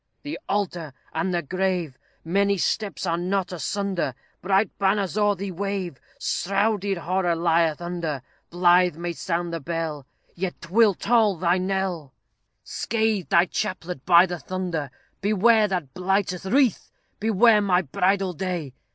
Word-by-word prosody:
"The 290 +1 -5
altar 175 -8 -2 0.2
and 170 +4 -1
the 175 -2 -1
grave 180 -3 -1 0.3
Many 200 +3 +2
steps 200 +2 -1
are 170 -1 0
not 185 +1 -1
asunder; 185 -4 -2 0.3
Bright 195 +2 +1
banners 195 -1 +1
o'er 205 -1 +3
thee 195 +1 -5
wave, 190 -5 -3 0.2
Shrouded 200 0 0
horror 175 0 0
lieth 165 -2 +2
under. 165 -6 -3 0.3
Blithe 175 0 +4
may 170 +1 -4
sound 170 0 -3
the 165 - -2
bell, 160 -3 -4 0.3
Yet 180 0 -4
'twill 200 +3 +3
toll 220 -2 +3
thy 175 +2 +2
knell; 185 -6 -2 0.5
Scathed 220 -4 -1
thy 175 -2 +5
chaplet 180 -7 -4
by 175 0 +7
the 175 -2 -5
thunder 175 -6 -3 0.3
Beware 215 +2 +4
that 175 -9 -3
blighted 185 0 -1
wreath!" 250 +1 +2 0.3
Beware 220 +1 +4
my 190 -2 +2
bridal 185 +5 0
day! 175 -6 -4
185 Hz, 135 wpm, -24 LUFS, 170-200 Hz, 0.5 s, by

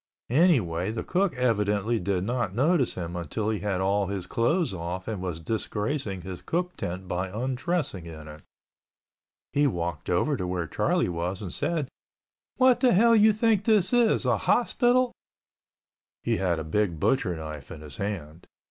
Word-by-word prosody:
Anyway 120 - +3
the 110 +1 -3
cook 185 -2 0
evidently 110 -2 +1
did 90 0 -1
not 120 -3 -2
notice 145 +1 +2
him 85 -1 -5
until 105 +6 -2
he 105 - -2
had 100 -3 -1
all 100 +1 +1
his 95 -2 -4
clothes 135 - +1
off 90 +1 -5
and 105 -4 -3
was 90 -3 -4
disgracing 105 - -2
his 95 0 -7
cook 180 +2 -2
tent 90 +2 -5
by 90 +1 -2
undressing 125 - -2
in 80 -2 -9
it. 75 0 -11 1.1
He 145 0 +3
walked 85 - -3
over 90 +12 +2
to 90 - -3
where 90 -2 -2
Charlie - - +1
was, 90 +3 -3
said, 155 -1 -1 0.7
"What 255 -1 +5
the 255 -2 +4
hell 230 +5 +5
you 215 0 +6
think 215 -1 +2
this 215 -2 +3
is... 240 -2 +3
a - - +2
hospital?" 250 0 +2 1.1
He - - +1
had 90 -3 0
a 80 - -3
big 85 +1 0
butcher 90 - +1
knife 75 -3 -7
in 75 - -9
his 75 -4 -10
hand. 85 -5 -5
105 Hz, 165 wpm, -27 LUFS, -, 1.1 s, you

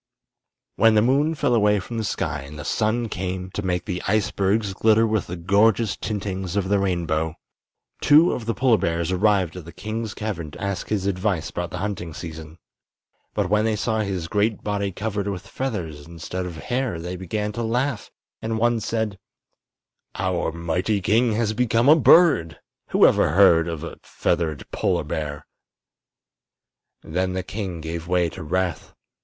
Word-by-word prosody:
When 115 -1 +5
the 105 - +5
moon 145 +6 +2
fell 125 - +1
away 105 -2 +3
from 115 +5 -5
the - - -1
sky 80 -7 -2
and 70 +2 -10
the 75 - -7
sun 115 +4 0
came 95 -1 -4
to 105 - -3
make 90 -2 -1
the 90 0 -3
icebergs 100 0 +1
glitter 110 +3 +4
with 110 -3 0
the 90 - -5
gorgeous 100 +5 +2
tintings 95 -4 -4
of 95 -2 0
the 100 -1 +3
rainbow, 85 -4 -1 0.7
two 155 +4 +6
of 115 -2 -4
the 115 - 0
polar 125 -4 +3
bears 85 +1 -1
arrived 95 -3 +2
at 90 -3 -8
the 85 - -9
king's 110 +4 -5
cavern 95 -8 -4
to - - -12
ask 100 -1 -3
his 100 -3 -1
advice 95 -3 -1
about 90 0 -3
the 90 - -6
hunting 90 -4 -4
season. 80 -1 -8 0.8
But 100 -3 0
when 105 0 +3
they 110 -1 +1
saw 110 +1 -1
his 95 -5 -2
great 105 +3 0
body 100 -1 -1
covered 100 +1 -3
with 100 -1 -4
feathers 85 - -4
instead 85 +2 -5
of 85 - -7
hair 120 0 -2
they 90 +2 -5
began 105 +4 -3
to 115 - -4
laugh, 120 +2 -1 0.3
and 110 0 -2
one 120 +1 +2
said: 110 -2 -2 1.0
"Our - - -1
mighty 85 +5 -1
king 110 +4 +2
has 110 -1 0
become 115 +1 +2
a 150 - +9
bird! 155 - +5 0.3
Who - - +5
ever - - +4
before 80 - -1
heard 85 -4 +6
of 80 -2 -4
a 85 - -7
feathered 80 -5 -1
polar - - 0
bear?" 75 -2 -4 1.6
Then 90 +3 -1
the 95 0 -2
king 95 -6 -5
gave 80 +1 -5
way 90 -1 +2
to 70 - -9
wrath. 90 +3 -2
100 Hz, 175 wpm, -23 LUFS, 85-110 Hz, 1.6 s, a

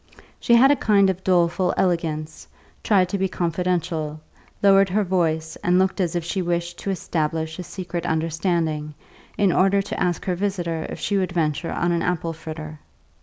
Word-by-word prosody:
She 235 - +4
had 265 +4 +6
a - - +5
kind 200 -6 +3
of 185 0 -8
doleful 180 0 +2
elegance, 160 -4 -1 0.4
tried 190 -4 +3
to 200 - -2
be 190 - +1
confidential, 170 -3 -2 0.4
lowered 195 -1 +6
her 210 +3 +1
voice 160 -4 -1
and 180 +1 +1
looked 190 +1 +1
as 175 -1 -1
if 175 - -1
she 185 +3 -2
wished 175 0 -2
to - - -4
establish 160 -3 -2
a - - -4
secret 175 -1 -5
understanding, 160 -2 -1 0.4
in 200 -3 +3
order 195 +3 +3
to - - -5
ask 175 -2 -1
her 185 - 0
visitor 175 -4 -2
if - - -6
she 200 - 0
would 185 -2 -2
venture 165 -1 -1
on 175 - 0
an 170 -1 0
apple 170 -2 -1
fritter. 155 -1 -8
175 Hz, 175 wpm, -23 LUFS, 160-190 Hz, 0.4 s, had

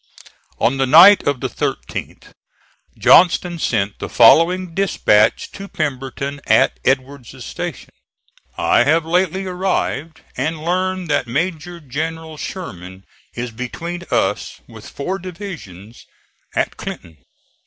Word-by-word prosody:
On 120 +4 +1
the 135 0 +1
night 175 +9 +8
of 140 -4 0
the - - -1
13th - - -5 0.6
Johnston 175 0 +4
sent 105 -8 -1
the - - -5
following 165 +9 +5
dispatch 110 - +2
to 195 0 -9
Pemberton 140 -3 -4
at 135 - +3
Edward's 130 -1 -2
station: - - -6 0.7
"I - - +3
have 160 +3 +2
lately 185 +3 0
arrived, 180 -4 -2
and 155 +4 -3
learn 185 +1 -1
that 145 -4 0
Major 170 +5 -3
General 160 +2 -5
Sherman 95 - -8 0.3
is 120 0 -4
between 165 +9 -6
us - - -1
with - - -12
four 185 +7 -4
divisions 165 - -10 0.5
at - - -1
Clinton. 80 -2 -8
155 Hz, 115 wpm, -19 LUFS, 130-180 Hz, 0.7 s, night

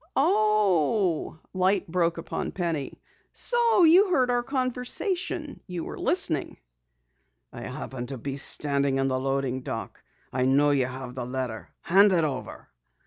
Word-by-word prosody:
"Oh!" 200 -5 +2 0.2
Light 185 0 +1
broke 170 0 0
upon 165 - -4
Penny. 165 -6 -3 0.3
"So 470 -5 +2
you 360 +5 +6
heard 255 -8 +2
our 245 0 +1
conversation! 280 - -2
You 175 -3 -5
were - - -7
listening!" - - +1 1.0
"I - - -7
happened 125 -2 -6
to 135 - -4
be 135 +3 -5
standing 140 -1 +2
in 135 - +1
the 130 0 -1
loading 135 -1 -1
dock. 115 -3 -6 0.3
I 130 0 +1
know 140 +3 +3
you 135 -3 +2
have 130 -1 -7
the 130 -1 -5
letter. 125 -3 -5
Hand 195 +3 +5
it 170 -3 +2
over." 140 -4 -5
165 Hz, 140 wpm, -26 LUFS, 135-215 Hz, 1.0 s, you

